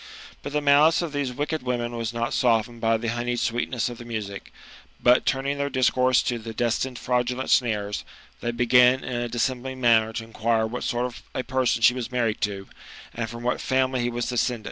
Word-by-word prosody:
But 145 - -6
the 150 0 0
malice 150 +4 +5
of 160 -3 -5
these 140 -3 -1
wicked 145 +4 -3
women 120 -1 -2
was 115 -1 -3
not 120 0 -2
softened 115 -2 +1
by 115 0 +2
the 115 +1 -3
honeyed 120 +1 -2
sweetness 120 0 -1
of 120 -2 -7
the - - -8
music; 105 -4 -6 0.5
but 125 +1 +4
turning 140 +1 0
their 140 0 0
discourse 130 -1 +3
to 125 -2 -2
the 110 0 -8
destined 120 +2 -1
fraudulent 125 +1 -1
snares, 105 -4 +1 0.4
they 120 - -3
begin 125 +2 +4
in 125 -1 -3
a 120 - -3
dissembling 130 +2 -2
manner 115 -3 +4
to 115 - -4
inquire 115 0 0
what 120 +3 -4
sort 120 +1 0
of 125 -1 -7
a 130 - -1
person 125 -2 0
she 125 - +7
was 125 -1 -5
married 115 -4 -1
to, 100 -2 -2 0.5
and 115 -1 -3
from 115 +1 -8
what 125 - -1
family 130 -1 +1
he 120 - 0
was 120 0 -3
descended. 125 -1 0
120 Hz, 205 wpm, -25 LUFS, 115-130 Hz, 0.5 s, she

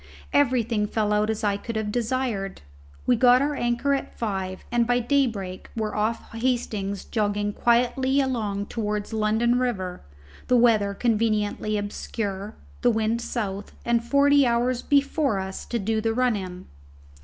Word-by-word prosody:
Everything 235 -6 +2
fell 210 -1 0
out 210 +1 +2
as 220 -1 -2
I 200 -1 +1
could 230 +2 -6
have 215 -1 -1
desired. 230 - -2 0.4
We 250 - +4
got 245 +1 +6
our 290 +2 0
anchor 240 +1 0
at 275 - -3
five, 190 -4 -3
and 235 -1 +2
by 245 0 +3
daybreak 230 -8 -1
were 215 -1 -2
off 215 +2 -1
Hastings 225 -5 -2
jogging 205 -1 -1
quietly 250 +4 +2
along 215 -7 -1
towards 210 -1 -3
London 220 +3 +2
river, 190 -8 -2 0.5
the 250 - +4
weather 215 -4 +3
conveniently 215 -2 0
obscure, 205 0 -4 0.3
the 245 - +4
wind 225 0 0
south, 205 -5 -4
and 235 -1 +2
forty 280 +3 +4
hours 240 +1 +1
before 280 - +2
us 190 0 -5
to 240 - -2
do 220 +1 -1
the 225 0 0
run 250 -2 +2
in. 185 -2 -6
225 Hz, 150 wpm, -25 LUFS, 205-245 Hz, 0.5 s, got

